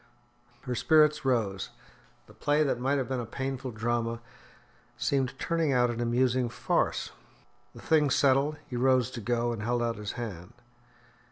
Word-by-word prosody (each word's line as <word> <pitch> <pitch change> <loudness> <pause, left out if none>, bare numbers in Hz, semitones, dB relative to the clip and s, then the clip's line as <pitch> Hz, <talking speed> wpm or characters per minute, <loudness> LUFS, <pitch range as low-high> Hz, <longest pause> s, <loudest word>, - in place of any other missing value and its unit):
Her 125 - -4
spirits 150 +3 +4
rose; 105 -7 0 0.6
the - - -17
play 145 +1 +1
that 135 -4 0
might 135 +3 +1
have 130 - -1
been 130 -1 -2
a 120 - -3
painful 135 +1 -4
drama 115 0 -2 0.8
seemed 135 -2 0
turning 165 -3 0
out 125 -1 +3
an 120 0 -4
amusing 125 +1 +1
farce. - - -1 0.6
The - - -11
thing 150 -3 +3
settled, 140 +3 +3
he 125 - -6
rose 130 0 +2
to 120 - -6
go, 120 +2 0
and 110 - -5
held 120 +2 0
out 115 -1 -1
his 105 -1 -5
hand. 105 -4 -7
125 Hz, 160 wpm, -29 LUFS, 115-135 Hz, 0.8 s, spirits